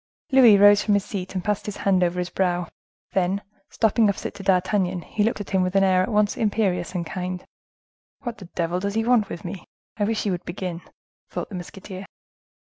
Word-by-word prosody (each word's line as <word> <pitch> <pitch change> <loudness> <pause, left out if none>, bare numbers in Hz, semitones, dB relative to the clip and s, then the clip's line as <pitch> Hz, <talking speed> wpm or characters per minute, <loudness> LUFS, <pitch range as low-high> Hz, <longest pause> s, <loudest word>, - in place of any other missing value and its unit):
Louis 245 -6 +8
rose 205 0 +7
from 210 - +3
his 200 - 0
seat, 190 -2 -5
passed 210 +1 -1
his 210 - -4
hand 190 -2 +2
over 175 0 0
his 180 0 -2
brow, 180 -2 0 0.4
then, 190 +2 0 0.3
stopping 220 -1 +3
opposite 200 - -3
to 200 - -9
D'Artagnan, 185 -1 +1
he 215 - -3
looked 225 0 0
at 205 - -8
him 190 - +3
with 185 +1 -1
an 195 - +5
air 185 -1 +4
at 185 - -1
once 210 -1 +2
imperious 195 -5 0
and 170 -1 -1
kind, 180 +1 -5 0.8
"What 240 -3 -5
the 190 - -9
devil 175 0 -2
does 200 +2 -3
he 225 0 +1
want 235 -4 +3
with 170 - -7
me? 175 +1 -6 0.3
I 205 - +1
wish 225 +1 -1
he 205 - 0
would 175 -1 -3
begin!" 175 -1 -5 0.5
thought - - -5
the 200 - -7
musketeer. 185 +2 -8
195 Hz, 210 wpm, -24 LUFS, 180-205 Hz, 0.8 s, Louis